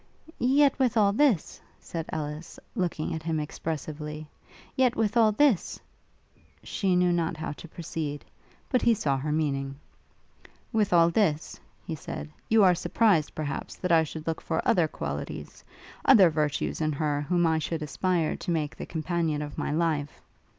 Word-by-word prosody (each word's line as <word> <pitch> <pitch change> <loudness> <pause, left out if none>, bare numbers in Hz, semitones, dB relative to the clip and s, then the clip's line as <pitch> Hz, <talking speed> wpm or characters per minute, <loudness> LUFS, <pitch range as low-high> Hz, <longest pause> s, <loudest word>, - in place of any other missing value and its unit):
'Yet, 275 +2 +3
with 250 -3 +2
all 200 -2 +4
this,' 240 - +2 0.2
said 165 -2 -6
Ellis, 155 +1 -5
looking 175 -4 -2
at 160 - -4
him 160 -1 -1
expressively, 150 0 -5 0.7
'with 220 0 0
all 225 -2 +5
this....' 235 - +2 0.8
she 190 -3 0
knew 180 0 +3
not 165 -2 -1
how 155 - -4
to 150 - -10
proceed; 155 -3 -5 0.4
but 255 - +1
he 235 -1 +4
saw 150 -10 0
her 150 +3 -2
meaning. 140 -3 -1 1.0
'With 215 -3 +2
all 170 -1 +5
this,' 165 -6 0 0.3
he - - -4
said, 75 +1 -6 0.2
'you 220 -1 +5
are 185 -2 +6
surprised, 180 -2 +2
perhaps, 150 -2 -4
that 180 - -3
I 165 -1 +6
should 155 0 -7
look 165 -1 -2
for 165 - -2
other 180 -9 +4
qualities, - - -6 0.4
other 195 -10 +7
virtues 150 0 -1
in 155 -1 +1
her 145 0 -1
whom 175 +3 +1
I 160 -1 +2
should 160 +1 -3
aspire 165 +2 0
to - - -7
make 155 -3 -1
the - - -7
companion 160 -2 -1
of 145 -1 -7
my - - -2
life? 150 -2 -1
165 Hz, 160 wpm, -27 LUFS, 150-190 Hz, 1.0 s, other